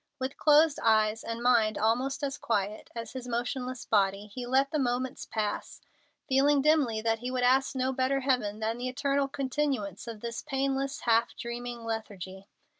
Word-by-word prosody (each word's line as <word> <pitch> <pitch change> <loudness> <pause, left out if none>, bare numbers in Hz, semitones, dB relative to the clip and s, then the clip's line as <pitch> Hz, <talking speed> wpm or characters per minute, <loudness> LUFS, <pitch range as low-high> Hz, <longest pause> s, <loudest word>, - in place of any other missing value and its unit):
With 260 0 -3
closed 300 0 +5
eyes 220 0 +3
and 230 +1 -4
mind 230 -3 +3
almost 250 +7 0
as 275 0 -2
quiet 210 -1 -2
as 230 0 -5
his 255 -1 -6
motionless 250 +1 -3
body, 200 -1 +2
he 240 +4 -7
let 270 +2 +2
the 305 - 0
moments 255 0 -1
pass, 210 -2 -3 0.5
feeling 280 +1 +4
dimly 285 -8 +3
that 225 0 +1
he 245 +2 -4
would 255 -1 -1
ask 265 +2 +3
no 260 0 0
better 265 +1 +1
heaven 245 -6 0
than 225 +2 -1
the 255 +1 -2
eternal 275 +1 0
continuance 265 - -2
of 225 -2 -7
this 235 0 -4
painless, 270 +1 -1
half 230 0 +2
dreaming 240 0 -5
lethargy. 200 -4 -6
245 Hz, 170 wpm, -29 LUFS, 225-270 Hz, 0.5 s, closed